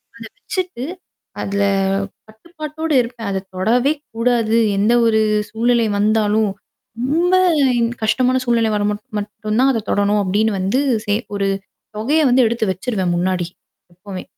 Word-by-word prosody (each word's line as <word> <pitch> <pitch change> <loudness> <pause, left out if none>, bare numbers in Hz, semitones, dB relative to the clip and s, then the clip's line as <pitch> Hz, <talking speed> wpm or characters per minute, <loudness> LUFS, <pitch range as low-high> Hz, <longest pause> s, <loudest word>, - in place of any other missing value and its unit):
ஆ. - - -14
அத 230 - -8
வச்சுட்டு 365 - -4 0.6
அதுல 200 +1 -1 0.7
கட்டுப்பாட்டோட 310 +6 -7
இருப்பேன். 235 -2 -6
அத 195 -1 -1 0.2
தொடவே 240 +9 +2 0.2
கூடாது. 230 -1 +1 0.2
எந்த 210 +4 +3
ஒரு 220 -1 +3 0.3
சூழ்நிலை 235 0 +1
வந்தாலும். 215 0 +2 0.5
ரொம்ப 335 +8 +2 0.7
கஷ்டமான 255 +3 +2
சூழ்நிலை 230 -2 +2
வர 205 - 0
மட் 210 0 -6 0.2
மட்டும் 215 +1 -3
தான் 270 +1 +4
அத 225 -3 -2
தொடணும் 205 +1 +2
அப்பிடின்னு 205 +2 +1
வந்து 195 +8 +1 0.3
சே 205 -1 +1 0.2
ஒரு 200 -1 0 0.5
தொகைய 290 +9 +2
வந்து 250 0 +4
எடுத்து 230 0 -1
வச்சுருவேன் 185 -2 -2
முன்னாடி. 180 0 0 0.5
எப்பமே! 185 +1 -8
220 Hz, 135 wpm, -19 LUFS, 205-250 Hz, 0.7 s, தான்